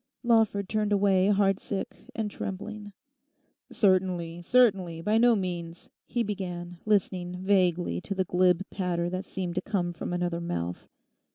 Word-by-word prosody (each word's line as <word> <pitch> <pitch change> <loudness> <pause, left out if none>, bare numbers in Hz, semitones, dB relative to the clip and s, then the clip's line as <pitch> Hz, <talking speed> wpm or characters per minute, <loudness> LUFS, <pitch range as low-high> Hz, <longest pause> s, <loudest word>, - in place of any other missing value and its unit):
Lawford 220 -4 +3
turned 210 0 0
away 195 -2 +3
heartsick 200 +2 0
and 220 -3 -2
trembling. 205 +2 -6 0.8
'Certainly, 180 -4 +1
certainly, 190 -6 +3
by 210 +6 +2
no 240 0 +5
means,' 175 -3 -5 0.2
he 240 - 0
began, 175 -4 -5
listening 180 -3 0
vaguely 180 - +2
to 195 - -4
the 190 - +1
glib 180 +1 +2
patter 175 -2 -1
that 185 +2 -3
seemed 180 -2 -4
to 180 - -1
come 185 -4 -1
from 170 - -5
another 175 -1 -1
mouth. 85 - -4
185 Hz, 140 wpm, -28 LUFS, 175-205 Hz, 0.8 s, no